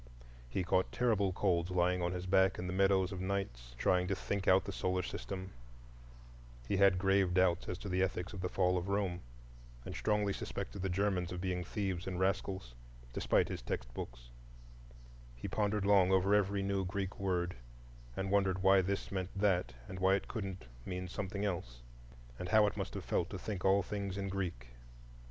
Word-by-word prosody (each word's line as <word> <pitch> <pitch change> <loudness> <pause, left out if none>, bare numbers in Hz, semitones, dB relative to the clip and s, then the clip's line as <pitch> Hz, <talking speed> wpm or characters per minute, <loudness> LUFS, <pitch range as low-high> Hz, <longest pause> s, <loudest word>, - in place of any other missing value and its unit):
He 90 - -1
caught 90 +1 +1
terrible 105 -6 +2
colds 90 -2 +1
lying 90 0 +2
on 85 0 0
his 90 0 -4
back 95 0 +4
in 90 - -4
the 90 - -3
meadows 95 0 +3
of 95 -2 -4
nights, 75 -12 -3
trying 90 +5 +2
to 95 - 0
think 100 0 -3
out 95 0 +6
the 100 - -4
solar 90 -1 -1
system; 95 +1 -5 1.2
he 100 - +1
had 100 -1 +5
grave 95 -1 +3
doubts 90 -2 +3
as 90 - -2
to 100 - -7
the 95 -1 +1
ethics 95 0 -1
of 95 - -5
the 90 - -1
Fall 90 -1 +2
of 90 - -6
Rome, 100 -3 0 0.7
and - - -5
strongly 105 -2 +1
suspected 100 - -5
the 95 - -1
Germans 90 -1 0
of 90 - -4
being 90 -1 -1
thieves 95 -1 -3
and 90 -1 -3
rascals, 95 -8 -1 0.4
despite - - +2
his - - -5
textbooks; - - -6 1.1
he - - -6
pondered 105 -1 0
long 100 -2 +5
over 95 +1 +4
every 100 -1 +2
new 100 0 0
Greek 95 +1 -3
word, 90 -2 0 0.6
and 95 0 -2
wondered 95 -2 +2
why 95 0 +6
this 95 +2 -2
meant 95 -2 -2
that 90 -10 +1
and 95 0 -7
why 95 +1 +4
it 100 - -3
couldn't 95 - -5 0.2
mean 90 +3 -4
something 100 +2 -3
else, - - -4 0.6
and 90 - -4
how 110 +2 +6
it 100 - 0
must - - -4
have - - -5
felt - - 0
to - - -5
think 100 -4 -5
all 95 +1 +4
things 100 -1 -4
in 100 -1 -2
Greek. 90 -11 -3
95 Hz, 185 wpm, -34 LUFS, 90-100 Hz, 1.2 s, out